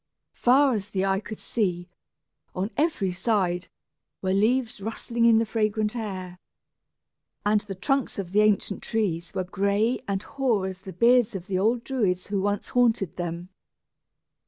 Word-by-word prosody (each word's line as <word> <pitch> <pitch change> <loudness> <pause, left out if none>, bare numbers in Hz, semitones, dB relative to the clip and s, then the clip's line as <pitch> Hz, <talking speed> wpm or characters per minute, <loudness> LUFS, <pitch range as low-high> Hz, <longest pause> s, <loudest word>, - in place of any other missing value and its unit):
Far 265 +2 +4
as 205 -2 -3
the 195 -1 0
eye 195 0 +1
could 215 +1 -8 0.2
reach, 180 -6 0 0.7
on 195 +4 -2
every 290 - +1
side, 185 -2 0 0.6
were 190 0 +1
leaves 225 +2 +1
rustling 230 +2 -1
in 230 -1 +6
the 225 - +2
fragrant 215 0 0
air; 185 -5 -5 1.1
and 210 0 +3
the 200 -2 -7
trunks 270 +7 0
of 185 -3 -4
the 210 +2 +4
ancient 210 -1 +1
trees 180 -7 -1
were 185 - 0
gray 200 +6 0
and 195 -1 -2
hoar 245 -8 0
as 190 -1 -5
the 190 0 -9
beards 235 +3 +4
of 180 -2 -5
the 190 -2 -1
old 230 +4 +1
Druids 200 -9 0
who 200 -2 0
once 205 +1 -1
haunted 230 -7 +2
them. 175 0 -4
205 Hz, 160 wpm, -26 LUFS, 190-230 Hz, 1.1 s, in